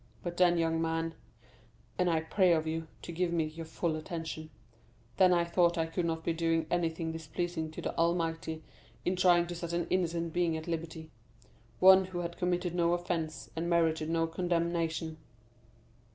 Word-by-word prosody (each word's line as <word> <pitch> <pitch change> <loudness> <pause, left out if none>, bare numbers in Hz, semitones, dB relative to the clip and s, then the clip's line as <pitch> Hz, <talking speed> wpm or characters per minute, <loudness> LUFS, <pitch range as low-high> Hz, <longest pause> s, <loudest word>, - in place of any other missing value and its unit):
But 175 -1 -4
then, 175 -1 +5
young 165 -1 +1
man 165 0 -1 0.9
(and 180 -1 +3
I 160 -1 +2
pray 180 +2 +3
of 160 -1 +1
you 160 0 -3 0.2
to - - -6
give 175 +1 0
me 170 -2 +1
your 160 +1 -7
full 160 0 -1
attention), 160 0 -5 0.7
then 185 -1 +6
I 170 -1 +3
thought 170 0 +2
I 165 - +2
could 170 +1 -2
not 160 0 -2
be 170 - 0
doing 165 0 +1
anything 165 -1 0
displeasing 160 0 -3
to 155 - -8
the - - -3
Almighty 165 -1 0 0.4
in 180 - +1
trying 175 -1 +4
to 175 - -5
set 170 0 -5
an 170 0 0
innocent 170 -2 0
being 170 -2 +1
at 160 - -8
liberty—one 165 - +1
who 180 -1 -4
had 170 0 -5
committed 180 -1 0
no 170 -1 +2
offence, 175 -3 -3
and 165 +1 -2
merited 160 -2 +2
not 165 0 0
condemnation." 170 -2 -1
170 Hz, 170 wpm, -31 LUFS, 160-175 Hz, 0.9 s, then